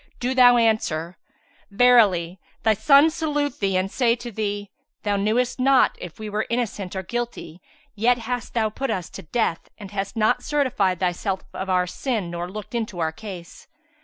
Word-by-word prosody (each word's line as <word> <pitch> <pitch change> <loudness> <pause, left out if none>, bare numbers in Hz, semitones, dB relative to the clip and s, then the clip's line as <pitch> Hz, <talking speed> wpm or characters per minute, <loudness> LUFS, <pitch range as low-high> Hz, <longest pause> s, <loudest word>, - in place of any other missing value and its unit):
do 250 +1 -1
thou 245 -1 +7
answer, 185 -7 0 0.5
'Verily 200 -6 +4 0.2
thy 220 - +4
sons 280 +8 +5
salute 295 -3 -2
thee 195 -2 +1
and 190 +1 -1
say 235 -3 +2
to 240 0 -8
thee, 205 -1 -3 0.3
Thou 205 -1 0
knewest 220 +6 0
not 265 0 +4
if 175 -3 -8
we 215 - -6
were 210 +1 -2
innocent 215 -6 -3
or 190 - -3
guilty, 230 -6 -5 0.3
yet 235 +3 +2
hast 245 +1 -5
thou 220 -2 +1
put 270 +5 -3
us 185 -1 -3
to - - -8
death 175 0 -2
and 200 -3 -10
hast 200 +1 -4
not 235 +3 +2
certified 245 - 0
thyself 185 +1 -1
of 190 - -5
our 180 -1 +2
sin 205 -1 -3
nor 175 +1 -4
looked 210 +4 -8
into 225 -5 -3
our 160 -2 0
case.' 180 -1 -10
215 Hz, 175 wpm, -23 LUFS, 185-245 Hz, 0.5 s, thou